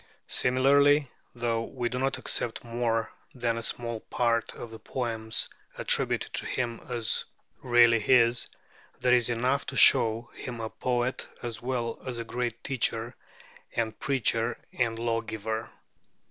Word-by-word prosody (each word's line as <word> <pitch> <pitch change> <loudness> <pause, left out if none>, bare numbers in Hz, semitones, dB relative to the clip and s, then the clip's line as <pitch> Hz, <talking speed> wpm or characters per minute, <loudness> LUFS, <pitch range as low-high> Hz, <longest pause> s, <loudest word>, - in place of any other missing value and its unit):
Similarly, 140 +2 +4 0.2
though 115 -1 0
we 120 +1 -3
do 125 +1 -3
not 135 +1 0
accept 115 - -1
more 115 -1 -1 0.2
than 120 -2 0
a 115 - -3
small 115 0 -3
part 115 0 0
of 115 - -8
the 110 - -9
poems 115 -3 -2 0.3
attributed - - +1
to - - -2
him 120 -2 -2
as 120 -3 0 0.4
really 120 -2 +5
his, 120 +1 +4 0.5
there 125 0 +3
is 120 -1 +4
enough 125 +4 0
to - - -4
show 115 -3 +5
him 120 -2 -7
a 110 -1 -4
poet, 125 0 -1 0.2
as 120 -2 -4
well 120 -2 -2
as 125 -2 -5
a 115 - -3
great 120 0 -3
teacher 120 -2 -1 0.6
and 115 -2 -1
preacher 120 -4 +1 0.2
and 115 -2 0
lawgiver. 115 -1 -2
120 Hz, 140 wpm, -28 LUFS, 115-125 Hz, 0.6 s, really